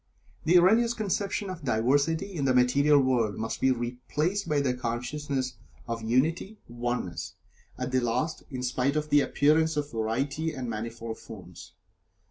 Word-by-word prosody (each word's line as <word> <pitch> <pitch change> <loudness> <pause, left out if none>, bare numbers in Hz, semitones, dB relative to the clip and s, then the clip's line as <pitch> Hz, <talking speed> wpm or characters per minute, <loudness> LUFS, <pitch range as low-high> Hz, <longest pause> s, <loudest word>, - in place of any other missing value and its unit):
The 175 +3 +6
erroneous 225 +7 +4
conception 200 -2 -2
of 170 -4 -8
diversity 140 - +1
in 145 -6 -2
the 130 -1 +3
material 140 +4 +5
world 120 -6 +1
must 115 +1 -4
be 130 - +4
replaced 130 - -1
by 150 -1 +2
the 135 -3 +1
consciousness 130 +2 -3 0.3
of 115 -1 -3
Unity 155 - 0
Oneness, 120 -7 -4 0.4
at 125 0 -3
the 130 - +3
last, 125 +7 -1
in 130 -3 -5
spite 125 +3 0
of 150 0 -2
the 145 - +6
appearance 155 +3 +2
of 145 0 -2
variety 135 +8 -1
and 130 -2 -4
manifold 115 0 -5
forms. 90 -5 -11
130 Hz, 150 wpm, -28 LUFS, 120-155 Hz, 0.4 s, The